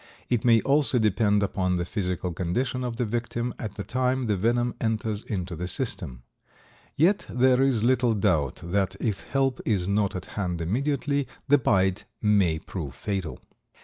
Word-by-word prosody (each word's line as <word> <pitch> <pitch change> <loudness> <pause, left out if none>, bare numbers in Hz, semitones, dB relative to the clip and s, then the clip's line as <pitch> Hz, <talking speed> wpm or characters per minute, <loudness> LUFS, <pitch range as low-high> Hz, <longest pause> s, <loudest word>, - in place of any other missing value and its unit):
It 120 -3 +2
may 115 -2 +5
also 140 -2 +3
depend 105 -2 +2
upon 90 -2 0
the 85 - -1
physical 90 -3 -2
condition 120 +9 -1
of 120 -2 -3
the 120 +1 -1
victim 120 +1 -2
at 105 -3 -5
the 100 - -4
time 130 +2 0
the 105 -2 +1
venom 120 +5 +1
enters 110 -2 -1
into 90 -6 -4
the 90 +3 -4
system. 90 - -4 0.7
Yet 180 +7 +3
there 125 +1 +3
is 130 -5 +2
little 125 -2 +3
doubt 80 - +1
that, 95 +2 0
if 105 -5 -1
help 135 -2 0
is 95 -5 0
not 100 -1 +1
at 90 - -5
hand 90 -4 -3
immediately, 140 - 0 0.2
the 145 +1 +5
bite 95 -5 +1
may 100 -7 +3
prove 80 -5 -6
fatal. 95 0 -4
105 Hz, 165 wpm, -26 LUFS, 90-125 Hz, 0.7 s, may